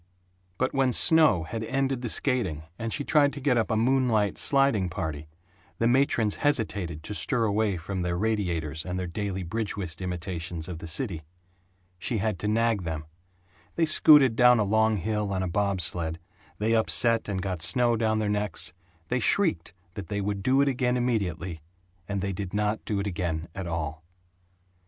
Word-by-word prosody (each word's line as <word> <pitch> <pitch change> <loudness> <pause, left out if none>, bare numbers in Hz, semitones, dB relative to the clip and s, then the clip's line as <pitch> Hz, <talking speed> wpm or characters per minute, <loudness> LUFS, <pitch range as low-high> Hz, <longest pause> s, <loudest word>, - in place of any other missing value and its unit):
But 130 - 0
when 135 -2 +2
snow 155 - +4
had 110 +7 -5
ended 135 +1 -1
the 120 - -3
skating 105 - -1 0.2
and 115 0 -3
she 145 - -2
tried 145 -1 +3
to 145 - -7
get 135 -2 +1
up 115 -2 +1
a 110 - +1
moonlight 115 -3 +2
sliding 135 -10 +2
party, 80 -4 -5 0.5
the 115 - +1
matrons 120 -4 +2
hesitated 100 - -1
to 105 - -5
stir 110 - 0
away 105 -2 +1
from 95 +3 -4
their 90 0 -1
radiators 85 -7 -1
and 90 0 -4
their 90 - -2
daily 95 +1 -4
bridge 105 +5 -3
whist 90 -3 -4
imitations 90 -2 -4
of 85 -3 -6
the 85 - -8
city. 85 - -2 0.8
She 115 - -1
had 105 -3 -1
to 105 - -2
nag 115 -1 +1
them. 80 -2 -4 0.7
They 165 - +2
scooted 150 -5 +6
down 125 +1 +6
a 110 - +2
long 110 +1 +2
hill 105 +2 -2
on 95 -1 -1
a - - -1
bob 100 +1 0
sled, 80 0 -1 0.4
they 110 +2 0
upset 115 0 +3
and 95 -2 -2
got 95 -3 -3
snow 120 +4 +2
down 110 -1 +1
their 110 -1 -1
necks 105 0 -2 0.4
they 125 - +1
shrieked 160 - +1 0.2
that 95 -3 -7
they 105 -1 -3
would 100 0 -2
do 130 +6 +3
it 140 - +2
again 125 -2 +1
immediately 95 -9 -2 0.5
and 100 -1 -2
they 100 0 -2
did 95 0 -5
not 105 +1 -1
do 105 -2 -1
it 100 - -2
again 85 -3 -3
at 95 -2 -5
all. 80 -1 -4
105 Hz, 185 wpm, -27 LUFS, 90-120 Hz, 0.8 s, scooted